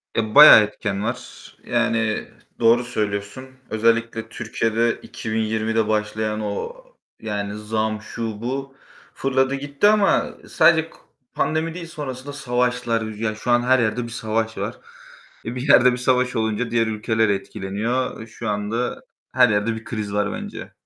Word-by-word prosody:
E, 110 -1 -1
bayağı 150 -5 +11
etken 105 -1 -3
var. 120 +3 -6
Yani, 115 -2 0 0.3
doğru 115 +1 +4
söylüyorsun. 105 +1 -3 0.2
Özellikle 115 0 0
Türkiye'de 115 0 0
2020'de 110 0 -1
başlayan 110 0 -1
o, 105 - -4 0.5
yani 105 -2 -3
zam, 110 0 -2
şu, 110 -1 -5
bu 135 +3 -4 0.4
fırladı 135 0 +1
gitti 145 +6 +1
ama 210 -1 +3 0.2
sadece 165 -1 +4
ko - - -19 0.4
pandemi 160 +1 -1
değil 170 -1 -7
sonrasında 140 -3 -7
savaşlar. 125 -3 0
Ya, 110 0 -3
şu 120 +3 -3
an 120 0 +4
her 130 +1 +3
yerde 120 +1 0
bir 115 - -7
savaş 115 -1 -2
var. - - -4 0.7
E, 115 - -4
bir 130 +3 -4
yerde 125 -2 +7
bir - - -2
savaş 125 0 +1
olunca 110 +1 -1
diğer 115 -1 +2
ülkeler 110 0 0
etkileniyor. 105 +5 -2
E, 110 - -8
şu 115 0 -7
anda 105 +4 -2 0.3
her - - +5
yerde 105 +2 +1
bir 110 - -9
kriz 105 -3 -4
var 105 0 0
bence. - - -7
115 Hz, 145 wpm, -22 LUFS, 110-125 Hz, 0.7 s, bayağı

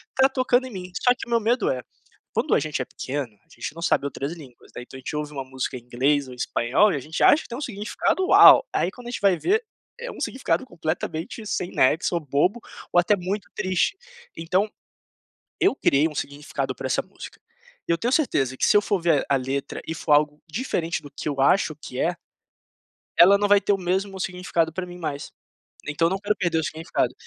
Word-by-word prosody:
tá 265 0 +5
tocando 255 -1 +1
em 255 - -10
mim". 180 -1 -7
Só 245 - +5
que 250 - -9
meu 235 -1 +3
medo 230 +2 +1
é: 130 -1 -1 0.5
quando - - +1
a - - +4
gente 150 -4 -3
é - - -3
pequeno, 130 -6 -5
a - - -40
gente 120 +5 -6
não 170 - -8
sabe 140 - +2
outras 140 +2 -4
línguas, 135 -8 -14
né, - - -6
então 130 - -12
a - - -9
gente 140 - -5
ouve 150 0 -3
uma 135 -1 -4
música 130 0 -4
em 120 - -11
inglês 135 +4 0
ou 125 - -9
em - - -13
espanhol 125 - +2
e - - 0
a - - -3
gente 155 +5 -6
acha 305 - +6
que - - -14
tem 240 +5 -5
significado 235 - -1
"Uau!" - - +8
Aí, 175 - +1
quando 245 +3 -12
a - - -5
gente - - -5
vai 195 -3 +4
ver, 430 - +1 0.4
é - - -6
um - - -11
significado 260 0 -1
completamente 165 +1 -4
sem 180 -3 -2
nexo, 160 +6 +2
ou 170 - 0
bobo, 150 - +1 0.3
ou 175 - +6
até 190 +4 +3
muito 190 +1 -4
triste. 185 - 0 0.4
Então, 180 +5 +1 0.9
eu 385 - +4
criei 150 - +3
um 150 - -12
significado 145 +2 -4
pra - - -4
essa - - +1
música - - -12 0.5
e - - +1
eu - - 0
tenho 240 +6 -1
certeza 135 - +1
que, - - +2
se - - +4
eu 205 - +4
for 200 -3 -1
ver 165 -5 +2
a 140 - +4
letra 135 +2 -4
e 160 - -3
for 150 - -3
algo 150 0 +2
diferente 175 -4 -2
do 145 - -10
que 145 - -5
eu 140 -2 -4
acho 155 +3 +3
que 135 -4 -9
é 175 +1 +1 1.0
ela 195 +3 +8
não 205 0 +1
vai 205 -1 +6
ter 205 - +1
o 195 - +1
mesmo 190 +2 -2
significado 175 -3 -1
pra 180 +1 -4
mim 180 0 -10
mais. 150 -4 -5 0.6
Então 160 +3 +1
eu - - 0
não 190 - -1
quero 210 +1 0
perder 170 -2 0
o - - -2
significado. 165 0 -2
170 Hz, 230 wpm, -24 LUFS, 145-205 Hz, 1.0 s, Uau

